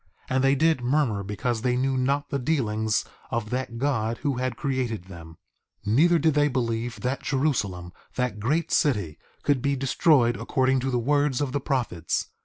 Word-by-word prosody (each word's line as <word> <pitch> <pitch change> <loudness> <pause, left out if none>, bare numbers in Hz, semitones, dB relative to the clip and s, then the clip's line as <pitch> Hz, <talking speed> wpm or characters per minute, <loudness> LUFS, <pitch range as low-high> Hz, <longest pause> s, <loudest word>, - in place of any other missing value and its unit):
And 130 0 +2
they 135 +1 +4
did 160 -1 +2
murmur 125 -5 +1
because 110 +4 -2
they 125 0 +1
knew 135 +1 +1
not 140 +3 0
the 140 - 0
dealings 110 -6 0 0.2
of 110 -2 -3
that 125 -2 -3
God 115 -4 0
who 140 -4 0
had 130 0 -2
created 130 -8 -2
them. 85 -3 -12 0.5
2:13 105 - 0
Neither 170 +7 +5
did 160 0 +2
they 145 0 +3
believe 120 -3 -2
that 130 +2 -2
Jerusalem, 105 - -1 0.2
that 125 -5 -1
great 150 +11 0
city, 105 - +1 0.2
could 140 -3 +2
be 140 +2 +1
destroyed 130 -2 +3
according 130 -1 +1
to 130 +1 -2
the 125 - 0
words 145 +2 +1
of 145 -3 -1
the 140 +1 -1
prophets. 120 - -1
130 Hz, 180 wpm, -25 LUFS, 115-140 Hz, 0.5 s, Neither